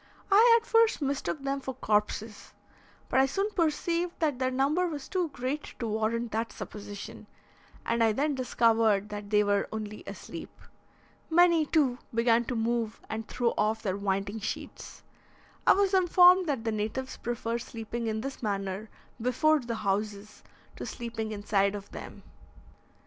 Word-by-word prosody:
I 460 Hz, +4 st, +7 dB
at 455 Hz, -, -21 dB
first 455 Hz, -1 st, +4 dB
mistook 280 Hz, 0 st, -2 dB
them 275 Hz, 0 st, -1 dB
for 265 Hz, -1 st, -5 dB
corpses, 210 Hz, -2 st, -1 dB, 0.5 s
but -, -, +2 dB
I 265 Hz, -, +5 dB
soon 395 Hz, +9 st, -1 dB
perceived 340 Hz, 0 st, 0 dB
that 295 Hz, -6 st, 0 dB
their 255 Hz, -1 st, +1 dB
number 280 Hz, +8 st, +1 dB
was 295 Hz, -5 st, -5 dB
too 360 Hz, -3 st, -1 dB
great 270 Hz, +3 st, -4 dB
to 235 Hz, -, -3 dB
warrant 220 Hz, +1 st, -1 dB
that 225 Hz, +2 st, -2 dB
supposition, 205 Hz, -1 st, -8 dB, 0.6 s
and 230 Hz, 0 st, +1 dB
I 225 Hz, -, +4 dB
then 285 Hz, +7 st, 0 dB
discovered 225 Hz, -5 st, +2 dB
that 205 Hz, -1 st, -6 dB
they 210 Hz, 0 st, +4 dB
were 205 Hz, -1 st, +1 dB
only 215 Hz, -1 st, -6 dB
asleep. -, -, -8 dB, 0.8 s
Many, 335 Hz, -2 st, +5 dB
too, 270 Hz, -6 st, +2 dB, 0.2 s
began 230 Hz, 0 st, +3 dB
to 250 Hz, -, -3 dB
move 230 Hz, -1 st, -1 dB
and 220 Hz, 0 st, -4 dB
throw 240 Hz, -2 st, 0 dB
off 220 Hz, +1 st, +1 dB
their 190 Hz, -3 st, -1 dB
winding 200 Hz, +1 st, -2 dB
sheets. 215 Hz, -, -6 dB, 0.6 s
I -, -, +9 dB
was 395 Hz, 0 st, +2 dB
informed 365 Hz, 0 st, +6 dB
that 270 Hz, -6 st, -1 dB
the 225 Hz, -, 0 dB
natives 220 Hz, +5 st, -3 dB
prefer 235 Hz, 0 st, -3 dB
sleeping 230 Hz, 0 st, -5 dB
in 220 Hz, 0 st, -1 dB
this 275 Hz, +2 st, -6 dB
manner 200 Hz, -1 st, -3 dB, 0.3 s
before 300 Hz, +6 st, +3 dB
the 235 Hz, -3 st, -4 dB
houses 205 Hz, +1 st, -2 dB, 0.3 s
to -, -, -5 dB
sleeping 230 Hz, -2 st, -5 dB
inside 205 Hz, -1 st, +1 dB
of 200 Hz, 0 st, -8 dB
them. -, -, -9 dB
235 Hz, 155 wpm, -29 LUFS, 215-290 Hz, 0.8 s, I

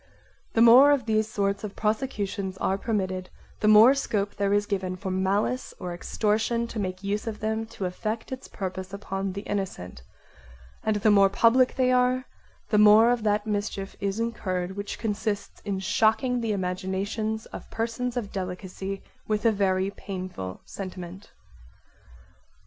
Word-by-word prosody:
The 225 Hz, -, +5 dB
more 250 Hz, +5 st, +9 dB
of 280 Hz, -5 st, +3 dB
these 215 Hz, -1 st, +1 dB
sorts 200 Hz, -2 st, -1 dB
of 205 Hz, -2 st, -6 dB
prosecutions 210 Hz, -4 st, -2 dB
are 190 Hz, -, 0 dB
permitted 185 Hz, -4 st, -2 dB, 0.3 s
the 215 Hz, -, +1 dB
more 215 Hz, +5 st, +8 dB
scope 210 Hz, -7 st, -1 dB
there 200 Hz, -1 st, 0 dB
is 205 Hz, 0 st, +2 dB
given 190 Hz, -3 st, -2 dB
for 190 Hz, +1 st, -5 dB
malice 195 Hz, +7 st, 0 dB
or 180 Hz, -1 st, -4 dB
extortion 220 Hz, +6 st, 0 dB
to 225 Hz, -, -5 dB
make 185 Hz, -1 st, -4 dB
use 205 Hz, +3 st, -2 dB
of 215 Hz, -2 st, -4 dB
them 220 Hz, +1 st, -2 dB
to 220 Hz, -4 st, -5 dB
effect 215 Hz, +6 st, -4 dB
its 260 Hz, 0 st, -6 dB
purpose 185 Hz, -1 st, -5 dB
upon 195 Hz, -1 st, -4 dB
the 200 Hz, -, -5 dB
innocent, 190 Hz, -, -4 dB, 0.8 s
and 215 Hz, -, +1 dB
the 210 Hz, +1 st, +3 dB
more 200 Hz, -1 st, +6 dB
public 235 Hz, +5 st, +4 dB
they 255 Hz, -1 st, +3 dB
are 250 Hz, +1 st, +2 dB, 0.4 s
the 210 Hz, -, +3 dB
more 215 Hz, +3 st, +7 dB
of 245 Hz, -2 st, 0 dB
that 210 Hz, 0 st, +1 dB
mischief 205 Hz, -2 st, -3 dB
is 200 Hz, +2 st, -2 dB
incurred 190 Hz, -5 st, -2 dB
which 200 Hz, 0 st, -5 dB
consists 210 Hz, -1 st, -3 dB
in 200 Hz, -2 st, -1 dB
shocking 225 Hz, +6 st, +2 dB
the 225 Hz, -2 st, -1 dB
imaginations 195 Hz, +3 st, -2 dB
of -, -, -8 dB
persons 235 Hz, +2 st, -2 dB
of 210 Hz, -5 st, -3 dB
delicacy 190 Hz, +1 st, -5 dB, 0.2 s
with 215 Hz, +1 st, -1 dB
a 230 Hz, -, +6 dB
very 195 Hz, -2 st, +1 dB
painful 185 Hz, -, -6 dB
sentiment. 185 Hz, 0 st, -8 dB
205 Hz, 155 wpm, -26 LUFS, 190-225 Hz, 0.8 s, more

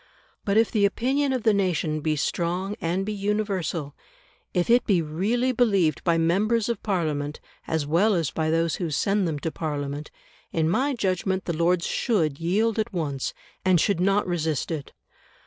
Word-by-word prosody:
But 200 Hz, 0 st, +2 dB
if 225 Hz, 0 st, +4 dB
the 210 Hz, -3 st, +2 dB
opinion 265 Hz, +7 st, +1 dB
of 255 Hz, -4 st, -1 dB
the 220 Hz, -, +4 dB
nation 175 Hz, -6 st, 0 dB
be 155 Hz, 0 st, 0 dB
strong 180 Hz, +6 st, -1 dB
and 180 Hz, +4 st, -1 dB
be 215 Hz, -, -2 dB
universal, 195 Hz, -7 st, -2 dB, 0.6 s
if 180 Hz, -2 st, 0 dB
it 240 Hz, +1 st, +4 dB
be 195 Hz, -4 st, +4 dB
really 200 Hz, +11 st, 0 dB
believed 200 Hz, -10 st, +2 dB
by 170 Hz, -2 st, +2 dB
members 205 Hz, +8 st, +2 dB
of 235 Hz, -4 st, -2 dB
Parliament, 155 Hz, -7 st, -2 dB, 0.3 s
as 160 Hz, -2 st, 0 dB
well 185 Hz, +8 st, +3 dB
as 165 Hz, -5 st, 0 dB
by 160 Hz, -1 st, -1 dB
those 165 Hz, 0 st, +1 dB
who 175 Hz, -3 st, -2 dB
send 195 Hz, +5 st, +1 dB
them 155 Hz, -3 st, -2 dB
to 160 Hz, +3 st, -3 dB
Parliament, 145 Hz, -2 st, -4 dB, 0.4 s
in 160 Hz, -1 st, +1 dB
my 265 Hz, -, +1 dB
judgment 190 Hz, -2 st, -1 dB
the 170 Hz, -, -2 dB
Lords 170 Hz, +2 st, +2 dB
should 160 Hz, -, 0 dB
yield 210 Hz, +7 st, +1 dB
at 220 Hz, +2 st, -1 dB
once, 145 Hz, -7 st, -3 dB, 0.3 s
and 185 Hz, -2 st, +4 dB
should 195 Hz, +1 st, +1 dB
not 195 Hz, +3 st, +2 dB
resist 160 Hz, -4 st, -1 dB
it. 150 Hz, -4 st, -4 dB
180 Hz, 175 wpm, -25 LUFS, 160-210 Hz, 0.6 s, if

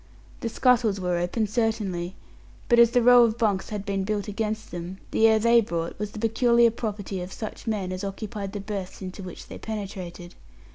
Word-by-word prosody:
The 230 Hz, -, -2 dB
scuttles 230 Hz, -4 st, +3 dB
were 180 Hz, -1 st, 0 dB
open, 180 Hz, +6 st, 0 dB
certainly, 210 Hz, -5 st, -1 dB, 0.5 s
but 240 Hz, -1 st, +5 dB
as 235 Hz, -1 st, +8 dB
the 245 Hz, 0 st, +2 dB
row 245 Hz, 0 st, +8 dB
of 230 Hz, -1 st, +1 dB
bunks 205 Hz, -5 st, 0 dB
had 205 Hz, -2 st, -4 dB
been 195 Hz, -2 st, -1 dB
built 205 Hz, +1 st, -2 dB
against 215 Hz, +1 st, -3 dB
them, 175 Hz, +2 st, -6 dB
the 225 Hz, -, +5 dB
air 220 Hz, 0 st, +5 dB
they 235 Hz, +2 st, +5 dB
brought 170 Hz, -5 st, -4 dB
was 210 Hz, -1 st, -2 dB
the 210 Hz, -, -11 dB
peculiar 235 Hz, +1 st, +4 dB
property 205 Hz, -4 st, -4 dB
of 180 Hz, +1 st, -6 dB
such 215 Hz, +3 st, -7 dB
men 200 Hz, -4 st, -1 dB
as 185 Hz, +1 st, -4 dB
occupied 200 Hz, 0 st, -5 dB
the 205 Hz, -, -4 dB
berths 195 Hz, -2 st, -6 dB
into 185 Hz, +2 st, -7 dB
which 180 Hz, -2 st, -8 dB
they -, -, -9 dB
penetrated. 190 Hz, -5 st, -6 dB
210 Hz, 195 wpm, -26 LUFS, 190-225 Hz, 0.5 s, as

